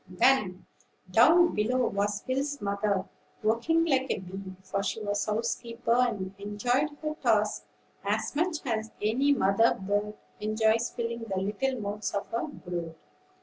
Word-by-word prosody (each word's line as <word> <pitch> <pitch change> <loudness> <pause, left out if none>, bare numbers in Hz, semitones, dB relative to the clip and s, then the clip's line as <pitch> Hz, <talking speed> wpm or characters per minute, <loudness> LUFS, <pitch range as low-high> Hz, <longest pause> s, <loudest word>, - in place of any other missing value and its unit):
Then, 190 -2 +2 0.5
down 330 - +6
below 245 +4 +1
was 200 0 -1
Will's 280 +2 -1
mother, 200 -1 0 0.4
working 240 +10 +2
like 265 -4 +2
a - - +1
bee; 190 +1 -8
for 195 +1 -2
she 200 +2 -2
was 205 -1 -1
housekeeper, 230 +2 -1
and 215 -6 +1
enjoyed 245 +8 0
her 305 0 -1
tasks 210 - +1 0.4
as 210 +7 -1
much 320 -1 0
as 220 -3 -1
any 245 +7 +2
mother 225 -3 +4
bird 205 +2 -1 0.2
enjoys 220 +2 +2
filling 235 -1 -4
the 195 -4 -3
little 215 +7 -1
mouths 210 0 -3
of 200 - -1
her 230 +6 -2
brood. 175 - -6
220 Hz, 145 wpm, -28 LUFS, 200-250 Hz, 0.5 s, down